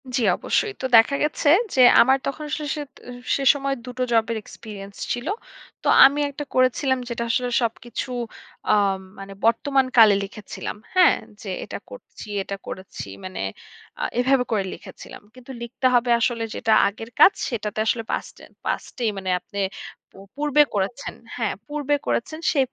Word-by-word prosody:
জি, 250 Hz, -, +1 dB, 0.2 s
অবশ্যই। 420 Hz, -2 st, 0 dB
তো -, -, -2 dB
দেখা 225 Hz, +5 st, +5 dB
গেছে 300 Hz, 0 st, +1 dB, 0.3 s
যে 260 Hz, -, +5 dB, 0.2 s
আমার 265 Hz, +2 st, +5 dB
তখন 300 Hz, +2 st, -4 dB
আসলে 300 Hz, 0 st, -3 dB
সেত 290 Hz, -2 st, -7 dB, 0.2 s
আ -, -, -6 dB, 0.2 s
সে 275 Hz, -, -2 dB
সময় 275 Hz, -1 st, -2 dB
দুটো 250 Hz, 0 st, -3 dB
জবের 225 Hz, 0 st, +2 dB
এক্সপেরিয়েন্স 200 Hz, -3 st, -10 dB, 0.2 s
ছিল। 245 Hz, +5 st, -5 dB, 0.6 s
তো -, -, -2 dB, 0.2 s
আমি 280 Hz, +2 st, +4 dB
একটা 290 Hz, +1 st, -6 dB
করেছিলাম 255 Hz, +1 st, +2 dB
যেটা 235 Hz, 0 st, -3 dB
আসলে 245 Hz, +1 st, 0 dB
সবকিছু 240 Hz, +2 st, -3 dB, 0.6 s
আ -, -, +6 dB, 0.5 s
মানে 195 Hz, 0 st, -8 dB
বর্তমান 265 Hz, +4 st, +3 dB
কালে 215 Hz, -3 st, +8 dB
লিখেছিলাম, 210 Hz, +1 st, -7 dB, 0.2 s
হ্যাঁ? 365 Hz, -2 st, +6 dB, 0.3 s
যে 200 Hz, -, -7 dB
এটা -, -, -6 dB
করছি, -, -, -12 dB, 0.2 s
এটা 200 Hz, -, -5 dB
করেছি 185 Hz, -, -7 dB, 0.2 s
মানে 95 Hz, 0 st, -6 dB, 0.6 s
আ -, -, -1 dB, 0.2 s
এভাবে 260 Hz, 0 st, +3 dB
করে 205 Hz, -3 st, +1 dB
লিখেছিলাম। -, -, -11 dB
কিন্তু 255 Hz, +1 st, -12 dB
লিখতে 235 Hz, +2 st, -5 dB
হবে 245 Hz, 0 st, +3 dB
আসলে 230 Hz, -1 st, 0 dB
যেটা 225 Hz, -2 st, -1 dB, 0.2 s
আগের 225 Hz, +3 st, -6 dB
কাজ 395 Hz, -, +9 dB, 0.2 s
সেটাতে 215 Hz, -3 st, -4 dB
আসলে 230 Hz, 0 st, +1 dB
পাস্টেন -, -, -6 dB, 0.2 s
পাস্টেই 235 Hz, -4 st, -2 dB
মানে 190 Hz, -1 st, -4 dB
আপনি 200 Hz, -, -8 dB, 0.5 s
পূ -, -, -16 dB, 0.2 s
পূর্বে 295 Hz, 0 st, +3 dB
করেছেন। 205 Hz, +8 st, -2 dB, 0.2 s
হ্যাঁ, 225 Hz, -4 st, -1 dB
পূর্বে 290 Hz, -1 st, 0 dB
করেছেন 310 Hz, +7 st, -2 dB
সে 290 Hz, -, 0 dB
245 Hz, 160 wpm, -23 LUFS, 220-275 Hz, 0.6 s, কাজ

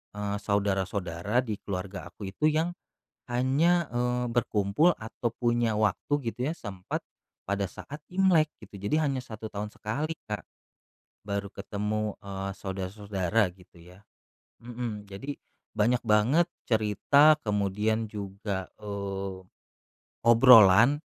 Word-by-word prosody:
eee, 105 Hz, 0 st, -2 dB
saudara-saudara 100 Hz, 0 st, 0 dB
di 105 Hz, -3 st, -3 dB
keluarga 95 Hz, -2 st, -5 dB
aku 95 Hz, +2 st, -7 dB
itu 150 Hz, +10 st, +1 dB
yang 160 Hz, +2 st, +1 dB, 0.6 s
hanya, 145 Hz, +8 st, +2 dB
eee, 125 Hz, 0 st, 0 dB
berkumpul 110 Hz, -, +2 dB
atau 110 Hz, +2 st, -3 dB
punya 120 Hz, -2 st, +1 dB
waktu 105 Hz, +6 st, 0 dB, 0.2 s
gitu 125 Hz, +4 st, -3 dB
ya, -, -, -1 dB
sempat, 95 Hz, -, -5 dB, 0.5 s
pada 100 Hz, -1 st, 0 dB
saat 145 Hz, -, -9 dB
Imlek 180 Hz, -5 st, +4 dB
gitu. 100 Hz, -1 st, -11 dB
Jadi 155 Hz, -, +2 dB
hanya 140 Hz, -4 st, 0 dB
1 110 Hz, -3 st, -8 dB
tahun 105 Hz, +1 st, -4 dB
sekali 150 Hz, +9 st, -3 dB
Kak, 105 Hz, -1 st, -4 dB, 0.8 s
baru 100 Hz, 0 st, -2 dB
ketemu, 105 Hz, +1 st, -3 dB
eee, 95 Hz, 0 st, -5 dB
saudara-saudara, 95 Hz, +1 st, -1 dB
gitu 90 Hz, -1 st, -21 dB
ya. 90 Hz, +3 st, -16 dB, 0.6 s
Mhm, 120 Hz, -4 st, -5 dB
jadi 120 Hz, +9 st, -6 dB, 0.4 s
banyak 120 Hz, +4 st, +2 dB
banget 115 Hz, +10 st, +4 dB, 0.2 s
cerita, 125 Hz, +8 st, +4 dB
kemudian 105 Hz, +2 st, 0 dB
juga, 100 Hz, -2 st, -5 dB
eee, 100 Hz, -2 st, -4 dB, 0.9 s
obrolan 115 Hz, +1 st, +8 dB
105 Hz, 115 wpm, -28 LUFS, 100-125 Hz, 0.9 s, obrolan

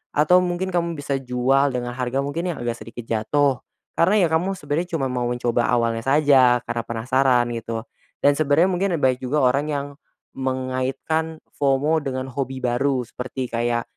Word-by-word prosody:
atau 155 Hz, +5 st, +5 dB
mungkin 180 Hz, +1 st, -2 dB
kamu 170 Hz, -1 st, -1 dB
bisa 140 Hz, -2 st, -2 dB
jual 130 Hz, +2 st, +2 dB
dengan 120 Hz, 0 st, -3 dB
harga 125 Hz, +2 st, -2 dB
mungkin 165 Hz, +6 st, -3 dB
yang 120 Hz, -, -7 dB
agak 120 Hz, -1 st, -3 dB
sedikit 115 Hz, +2 st, -9 dB
jatuh. 125 Hz, +5 st, +1 dB, 0.3 s
Karena 190 Hz, +3 st, +3 dB
ya -, -, +4 dB
kamu 180 Hz, +4 st, +1 dB
sebenarnya 165 Hz, +2 st, -3 dB
cuma 135 Hz, -4 st, -1 dB
mau 125 Hz, -1 st, -1 dB
mencoba 120 Hz, -1 st, 0 dB
awalnya 115 Hz, -2 st, +1 dB
saja, 135 Hz, -4 st, +4 dB
karena 115 Hz, -1 st, -3 dB
penasaran, 125 Hz, +1 st, +1 dB
gitu. 115 Hz, 0 st, -5 dB, 0.4 s
Dan 145 Hz, +1 st, +4 dB
sebenarnya 155 Hz, +5 st, +3 dB
mungkin 190 Hz, +2 st, 0 dB
banyak 130 Hz, -1 st, +3 dB
juga 130 Hz, +2 st, 0 dB
orang 140 Hz, +4 st, +2 dB
yang 145 Hz, -2 st, -2 dB, 0.5 s
mengaitkan 130 Hz, +5 st, -2 dB, 0.2 s
FOMO 145 Hz, +3 st, +2 dB
dengan 130 Hz, -2 st, -4 dB
hobi 130 Hz, 0 st, -4 dB
baru. 125 Hz, +1 st, +1 dB
Seperti 125 Hz, +2 st, -6 dB
kayak, 120 Hz, 0 st, 0 dB
135 Hz, 165 wpm, -22 LUFS, 125-150 Hz, 0.5 s, atau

